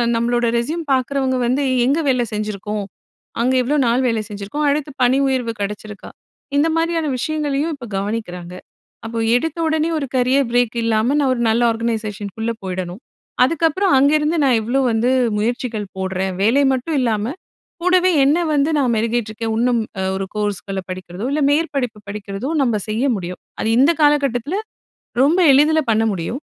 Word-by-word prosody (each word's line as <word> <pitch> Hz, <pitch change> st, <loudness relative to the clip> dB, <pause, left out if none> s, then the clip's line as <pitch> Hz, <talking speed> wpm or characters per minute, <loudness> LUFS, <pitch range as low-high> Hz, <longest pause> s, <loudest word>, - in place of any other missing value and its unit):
நம்மளோட 240 Hz, +1 st, +1 dB
ரெஸ்யூம் 315 Hz, +8 st, -2 dB
பார்க்குறவங்க 260 Hz, 0 st, 0 dB
வந்து, 260 Hz, +4 st, +1 dB, 0.2 s
"எங்க 285 Hz, +5 st, +2 dB
வேலை 250 Hz, -2 st, +2 dB
செஞ்சுருக்கோம்? 210 Hz, 0 st, -3 dB, 0.6 s
அங்க 255 Hz, +2 st, +2 dB
எவ்வளோ 280 Hz, +5 st, 0 dB
நாள் 240 Hz, +2 st, +2 dB
வேலை 230 Hz, -2 st, 0 dB
செஞ்சுருக்கோம்? 205 Hz, +9 st, -4 dB
அடுத்து 295 Hz, +1 st, -1 dB
பணி 250 Hz, +2 st, +4 dB
உயர்வு 250 Hz, -4 st, -1 dB
கெடைச்சிருக்கா?" 210 Hz, 0 st, -6 dB, 0.5 s
இந்த 295 Hz, +3 st, +3 dB
மாரியான 330 Hz, -1 st, 0 dB
விஷயங்களையும் 300 Hz, +2 st, -1 dB
இப்போ 250 Hz, -4 st, -10 dB
கவனிக்கிறாங்க. 195 Hz, -4 st, -4 dB, 0.5 s
அப்போ 230 Hz, +1 st, -5 dB, 0.2 s
எடுத்த 320 Hz, +5 st, -3 dB
உடனே 315 Hz, +1 st, +1 dB
ஒரு 280 Hz, -, -3 dB
கரியர் 255 Hz, +1 st, +2 dB
பிரேக் 245 Hz, -1 st, +1 dB
இல்லாம, 220 Hz, +1 st, +2 dB
நான் 275 Hz, -3 st, +2 dB
ஒரு 240 Hz, -, -3 dB
நல்ல 225 Hz, +2 st, +2 dB
ஆர்கனைசேஷன்குள்ள 220 Hz, -1 st, -3 dB
போயிடணும். 185 Hz, +2 st, -5 dB, 0.4 s
அதுக்கப்பறம், 330 Hz, +6 st, +2 dB
அங்கேருந்து 300 Hz, +4 st, +3 dB
நான் 260 Hz, -4 st, +4 dB
எவ்வளோ 240 Hz, +5 st, 0 dB
வந்து 225 Hz, +2 st, +1 dB, 0.3 s
முயற்சிகள் 225 Hz, 0 st, -2 dB
போடுறேன்? 190 Hz, 0 st, -2 dB
வேலை 240 Hz, +7 st, +4 dB
மட்டும் 265 Hz, +5 st, -2 dB
இல்லாம 225 Hz, +1 st, 0 dB, 0.5 s
கூடவே 365 Hz, 0 st, +4 dB
என்னை 295 Hz, +6 st, +3 dB
வந்து 290 Hz, +1 st, +2 dB
நான் 260 Hz, -4 st, +2 dB
மெருகேட்ருக்கிறேன் 225 Hz, 0 st, -1 dB
இன்னும் 240 Hz, +1 st, +2 dB, 0.4 s
ஒரு 195 Hz, 0 st, -2 dB
கோர்ஸ்கள்ல 200 Hz, -2 st, -2 dB
படிக்கிறதோ, 185 Hz, +2 st, -6 dB
இல்ல 300 Hz, +1 st, 0 dB
மேற்படிப்பு 275 Hz, -7 st, -1 dB
படிக்கிறதோ 200 Hz, +4 st, -5 dB
நம்ப 235 Hz, -5 st, +1 dB
செய்ய 225 Hz, +5 st, 0 dB
முடியும். 180 Hz, -1 st, -6 dB, 0.2 s
அது -, -, -1 dB
இந்த 285 Hz, +6 st, +5 dB
காலக்கட்டத்துல, 285 Hz, -, +2 dB, 0.7 s
ரொம்ப 320 Hz, +6 st, +3 dB
எளிதில 305 Hz, +3 st, +4 dB
பண்ண 220 Hz, 0 st, +2 dB
முடியும். 195 Hz, -, -4 dB
245 Hz, 145 wpm, -19 LUFS, 215-285 Hz, 0.7 s, இந்த